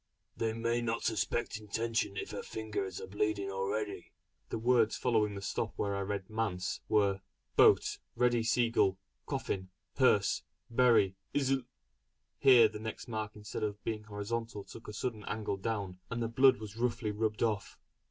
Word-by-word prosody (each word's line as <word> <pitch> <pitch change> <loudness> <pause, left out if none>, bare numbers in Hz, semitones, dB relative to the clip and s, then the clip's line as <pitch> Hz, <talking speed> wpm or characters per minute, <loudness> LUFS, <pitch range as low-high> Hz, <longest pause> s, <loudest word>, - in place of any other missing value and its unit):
They 110 -1 -1
may 115 +1 0
not 115 -1 -1
suspect 110 +1 0
intention 115 0 -1
if - - -4
her - - -4
fingers 105 -4 -4
are - - -6
bleeding 100 0 -1
already!" 100 0 -3 0.4
The - - -2
words 115 -1 +3
following 110 -4 +1
the 100 - -6
stop - - -2
where 100 -1 0
I - - -1
had 100 - -3
read 100 -2 -3
"manse" 105 -5 -2
were: 100 -2 +3 0.3
"Boat - - +5 0.2
ready 120 -1 +3
Seagull 115 -4 +2 0.3
Coffin 95 -1 -2 0.3
Hearse - - +4 0.3
bury 115 -6 +4 0.2
isl 135 -2 +1 0.4
" - - -50
Here 120 -4 +9
the 105 0 -7
next 110 +3 -6
mark 110 -2 -4
instead 105 0 -6
of 105 -1 -3
being 110 -1 -3
horizontal 105 +1 -4
took 115 - -12
a 105 - -6
sudden 110 -1 -3
angle 105 -2 -2
down, 100 -3 -3
and 115 - -3
the 115 - 0
blood 130 +2 +5
was 110 0 -8
roughly 115 -2 0
rubbed 110 +1 -1
off. 110 -3 -1
110 Hz, 165 wpm, -32 LUFS, 100-115 Hz, 0.4 s, Here